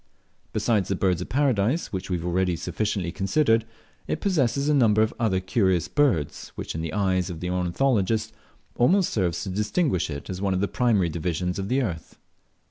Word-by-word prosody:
Besides 105 -2 +1
the 100 - +1
Birds 90 -2 +1
of - - -6
Paradise, 130 0 +1
which 95 0 -4
we 90 - 0
have 85 - -6
already 90 0 +1
sufficiently 95 0 -2
considered, 115 - +2 0.4
it - - -2
possesses 140 - +1
a 150 - +3
number 110 -6 +4
of 110 - -1
other 105 -5 +1
curious 95 -2 +1
birds, 125 - 0
which - - -5
in 80 - -4
the 80 -1 -3
eyes 95 -1 0
of 85 -3 -6
the 90 +1 -3
ornithologist 110 +3 0 0.4
almost 180 +10 +3
serves 90 -5 0
to 100 - -4
distinguish 105 - 0
it 70 -1 -6
as 95 0 -5
one 95 -2 +1
of - - 0
the 100 - +1
primary 105 -9 +2
divisions 90 +2 -2
of 95 +1 -3
the 135 +1 +2
earth. 85 - -5
100 Hz, 190 wpm, -25 LUFS, 90-115 Hz, 0.4 s, number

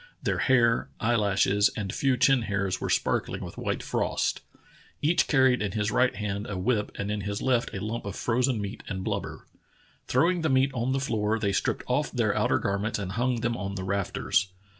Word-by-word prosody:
Their - - 0
hair, 115 -3 +3
eyelashes, 105 -3 +3
and 100 -3 -3
few 135 -2 +1
chin 125 +1 +4
hairs 95 -3 -1
were - - -2
sparkling - - 0
with - - -9
white - - -2
frost. - - -1 0.6
Each 165 +4 +2
car 135 -3 +4
ried 125 -3 +4
in 100 -3 -2
his 105 -1 0
right 125 +3 +2
hand 105 0 -3
a 100 - -3
whip 105 +2 0
and 100 0 -3
in 105 -1 -2
his 100 0 -3
left 125 -2 +1
a 100 +1 -5
lump 115 +1 -4
of 100 - -5
frozen 125 0 +1
meat 100 +2 -5
and 95 -3 -4
blubber. - - -4 0.6
Throwing 170 +7 +2
the 160 - +1
meat 135 +1 +3
on 125 +1 -1
the 135 - +1
floor, 110 -4 0
they 105 -3 0
stripped 95 - -1
off - - 0
their - - +1
outer - - +2
garments 100 +3 -1
and 100 -3 -4
hung 120 +2 0
them 120 0 0
on 100 -3 -4
the 95 - -4
rafters. 95 0 0
110 Hz, 205 wpm, -27 LUFS, 100-125 Hz, 0.6 s, chin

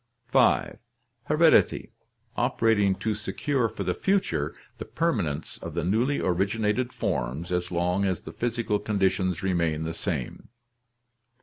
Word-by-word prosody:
5. - - +3 0.5
"Heredity, 160 +2 +3 0.4
operating 105 -4 +2
to 110 +3 -2
secure 115 +4 -1
for - - -5
the - - 0
future 190 - 0 0.2
the - - -5
permanence 85 - -2
of 85 -1 -7
the 85 - -1
newly 115 +10 +1
originated 105 +6 0
forms 80 - -3
as 90 0 -1
long 90 +3 +1
as 95 -2 -1
the - - -9
physical 115 -3 -1
conditions 95 -2 0
remain 85 -4 0
the 80 +1 -3
same. - - -4
100 Hz, 125 wpm, -26 LUFS, 85-115 Hz, 0.5 s, 5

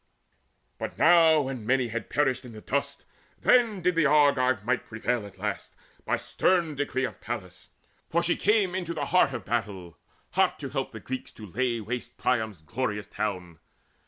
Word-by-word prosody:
But - - -5
now 160 -1 +6
when 130 -4 -4
many 125 +1 +1
had 120 +1 -5
perished 135 -3 +1
in 125 -2 -10
the 110 - -10
dust, 140 +5 -2 0.3
Then 225 -7 +3
did 180 +1 +3
the 165 -3 +3
Argive 140 -6 +3
might 125 +1 0
prevail 110 0 -2
at 100 - -16
last - - -4 0.3
By - - +1
stern 175 -4 +1
decree 140 -2 -2
of - - -8
Pallas; 95 -6 -6 0.4
for 170 +1 +1
she 175 - +3
came 205 -3 +2
Into 175 -3 -3
the 145 -2 -2
heart 180 -3 +3
of 120 -7 -6
battle, 100 -7 -3 0.3
hot - - +2
to - - -6
help - - -3
The - - -8
Greeks 130 0 -6
to 110 - -10
lay 120 +4 -1
waste 120 +3 -5
Priam's 110 -9 -1
glorious 105 +2 -3
town. 90 -6 -4
130 Hz, 175 wpm, -27 LUFS, 110-155 Hz, 0.4 s, now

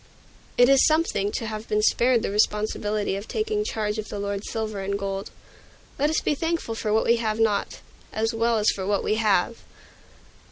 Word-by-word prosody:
It 245 - +7
is 275 0 +5
something 310 -10 +2
to 230 - -3
have 215 0 -5
been 210 0 +1
spared 240 +1 +3
the - - -1
responsibility 210 -1 0
of 200 +2 -6
taking 430 -1 -1
charge 215 - -2
of 215 - -6
the - - -5
Lord's 200 0 -4
silver 215 -3 -3
and 200 +1 -2
gold. 195 0 -4 0.7
Let 290 +2 +2
us 315 - +1
be - - +1
thankful 325 -5 -2
for 220 -1 -3
what 220 +1 +2
we 235 - +4
have 220 -1 -2
not, 215 -3 0 0.3
as 225 +2 -1
well 230 0 +1
as 210 0 +3
for 190 -1 -5
what 205 -1 +1
we 215 - 0
have! 215 +1 +2
215 Hz, 195 wpm, -25 LUFS, 205-235 Hz, 0.7 s, It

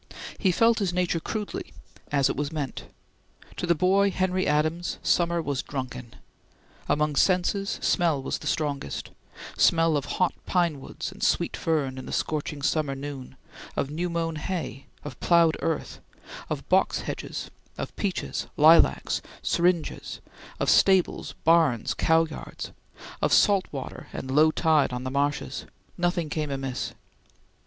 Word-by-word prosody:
He 190 - +3
felt 230 +5 +3
his 195 -4 0
nature 180 -2 +1
crudely, 210 +5 -5 0.4
as 140 -2 +3
it - - -1
was 145 +1 -2
meant. 145 -5 -4 0.7
To 175 - -2
the 170 - +4
boy 195 +4 +3
Henry 185 -1 0
Adams, 155 +4 0
summer 170 -1 +2
was 140 -3 -1
drunken. 130 -3 -6 0.7
Among 150 0 +1
senses, 190 +4 +2
smell 170 -6 +2
was 135 - -3
the - - -7
strongest 145 - -2 0.5
smell 165 -1 +4
of 145 - -1
hot 180 - +2
pine 170 -5 +1
woods - - -6
and - - -14
sweet - - +1
fern 140 -5 -1
in 130 - -8
the - - -6
scorching 150 -2 -2
summer 150 -2 +1
noon; 135 -2 -7 0.4
of 140 - -1
new 175 +4 -2
mown 165 -1 -2
hay; 160 -4 -4 0.2
of 145 -4 -8
ploughed 170 -2 +4
earth; 160 -2 -2 0.5
of - - -4
box - - +2
hedges; - - -5 0.3
of - - -5
peaches, 195 -3 -2
lilacs, 160 +2 +5 0.2
syringas; 175 -1 0 0.4
of - - 0
stables, 190 -2 +3
barns, 160 -8 +3
cow 160 0 +3
yards; 155 - -8 0.5
of - - +2
salt 200 -3 +5
water 135 -3 -7
and 130 - -5
low 155 +1 +6
tide 155 -5 +2
on 125 0 -4
the 130 - -3
marshes; 145 +2 -1 0.3
nothing 175 -2 0
came 150 -1 -2
amiss. 135 -2 -3
160 Hz, 145 wpm, -26 LUFS, 145-175 Hz, 0.7 s, low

